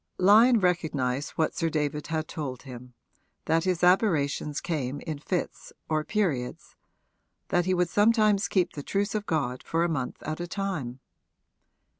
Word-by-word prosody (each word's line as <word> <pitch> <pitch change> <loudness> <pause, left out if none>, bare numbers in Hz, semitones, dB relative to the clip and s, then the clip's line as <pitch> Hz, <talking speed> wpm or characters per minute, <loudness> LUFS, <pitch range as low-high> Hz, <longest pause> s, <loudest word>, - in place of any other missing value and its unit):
Lyon 220 +6 +6
recognised 150 -7 0
what 160 - +1
Sir 165 - 0
David 150 -1 -2
had 155 -1 -2
told 140 -6 -5
him, 125 -2 -11 0.5
that 165 +2 +1
his 180 -2 0
aberrations 155 -6 +2
came 145 -5 -3
in 155 -3 -5
fits 175 +4 -4 0.2
or 155 -1 +1
periods 155 -12 -2 0.7
that 175 -1 +2
he 185 0 +1
would 180 0 +2
sometimes 210 0 +3
keep 180 -3 +1
the 145 - -6
truce 200 +6 -1
of 210 -1 -3
God 130 -6 -1
for 165 +1 0
a - - +2
month 130 -6 -3
at 155 +2 -4
a 175 - -4
time. 165 -10 -4
165 Hz, 155 wpm, -27 LUFS, 145-185 Hz, 0.7 s, Lyon